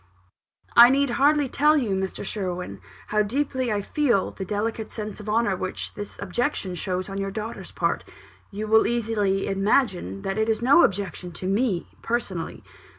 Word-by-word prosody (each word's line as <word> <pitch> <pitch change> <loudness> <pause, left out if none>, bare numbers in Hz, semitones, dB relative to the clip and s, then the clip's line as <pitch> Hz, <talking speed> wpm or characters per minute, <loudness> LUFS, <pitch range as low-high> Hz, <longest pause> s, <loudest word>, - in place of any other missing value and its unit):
"I 240 +1 +10
need 275 0 +2
hardly 290 +3 +3
tell 300 +4 +3
you, 240 -8 0
Mr. 190 +1 -2
Sherwin, 180 - -4 0.3
how 215 0 +2
deeply 260 +2 -1
I 205 -1 -1
feel 245 -6 +1
the 195 - -6
delicate 215 +3 -2
sense 215 -1 -6
of 210 0 -7
honour 215 -2 +2
which 185 +1 -4
this 205 -1 -7
objection 200 0 -2
shows 180 +1 -3
on 195 0 -5
your 195 0 -2
daughter's 215 -1 -6
part. 170 -1 -1 0.5
You 210 +2 -5
will 220 +1 +4
easily 215 -5 0
imagine 195 - 0
that 195 +2 -2
it 220 +1 +1
is 220 - +1
no 270 +8 +6
objection 185 -2 -1
to 180 - -7
me, 195 -1 0
personally. 205 -8 -3
210 Hz, 165 wpm, -25 LUFS, 190-235 Hz, 0.5 s, I